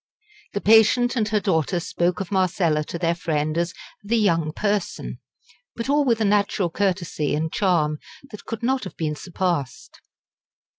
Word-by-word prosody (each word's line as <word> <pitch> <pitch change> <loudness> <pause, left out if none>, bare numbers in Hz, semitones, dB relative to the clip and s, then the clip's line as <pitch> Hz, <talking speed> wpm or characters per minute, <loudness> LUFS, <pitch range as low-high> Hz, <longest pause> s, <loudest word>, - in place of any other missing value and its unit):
The 200 - -2
patient 225 +4 +5
and 220 -4 +1
her 215 0 +1
daughter 175 -2 0
spoke 175 0 -1
of 190 - -5
Marcella 175 -5 +1
to 170 - -5
their 170 0 +1
friend 155 -3 -1
as 170 0 0 0.3
"the 225 +3 +1
young 165 -7 +2
person," 205 +1 -2 0.6
but 230 +3 -4
all 290 +1 +3
with 235 -4 +2
a 220 - +1
natural 200 -3 +1
courtesy 180 -6 -1
and 160 +1 -2
charm 155 -6 +1 0.3
that 210 - -10
could 225 0 -6
not 260 +2 +1
have 190 - -8
been 155 -2 -2
surpassed. 170 - -3
185 Hz, 160 wpm, -23 LUFS, 165-210 Hz, 0.6 s, patient